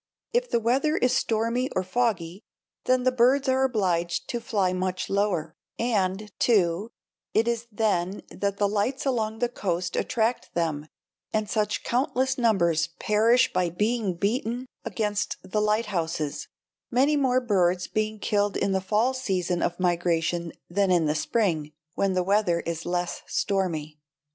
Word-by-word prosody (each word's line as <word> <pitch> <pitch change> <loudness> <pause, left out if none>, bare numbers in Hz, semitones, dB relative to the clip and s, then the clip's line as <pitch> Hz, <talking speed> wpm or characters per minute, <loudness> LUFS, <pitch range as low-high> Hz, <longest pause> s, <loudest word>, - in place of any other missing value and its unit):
If - - +1
the - - +2
weather 270 +7 +1
is 250 0 +2
stormy 230 +1 0
or 185 - +1
foggy, 185 -3 -1 0.4
then 255 0 +3
the 255 - +3
birds 255 +3 +3
are 260 0 +3
obliged 180 -9 0
to 240 - -2
fly 205 -6 0
much 185 0 -2
lower; 180 -6 0 0.2
and, 210 -3 0
too, 200 -2 +2 0.5
it 225 +2 +3
is 235 0 -1
then 200 -3 0
that 200 0 -2
the 205 - +2
lights 215 +8 -1
along 225 -5 0
the 245 +2 +1
coast 180 -6 -2
attract 230 +1 -1
them 155 -3 -1 0.4
and 215 -1 0
such 210 0 -1
countless 260 +1 0
numbers 170 -9 +2
perish 230 +4 +3
by 180 -1 +1
being 210 +1 0
beaten 230 +6 -1 0.2
against 205 -2 -2
the 210 +2 -1
lighthouses, 190 -9 -1 0.4
many 270 +5 +3
more 260 -3 +3
birds 185 -6 +1
being 215 0 -2
killed 205 -1 0
in 195 - 0
the 190 0 +1
fall 215 +7 +1
season 185 -8 -1
of 175 +1 -1
migration 170 -1 0 0.2
than 195 +2 +1
in 175 -3 +3
the 150 - +2
spring, 155 -2 0 0.2
when 195 -1 +1
the 185 0 +1
weather 190 -3 +2
is 165 -1 -4
less 175 0 -2
stormy. 160 -6 -1
205 Hz, 150 wpm, -26 LUFS, 175-235 Hz, 0.5 s, then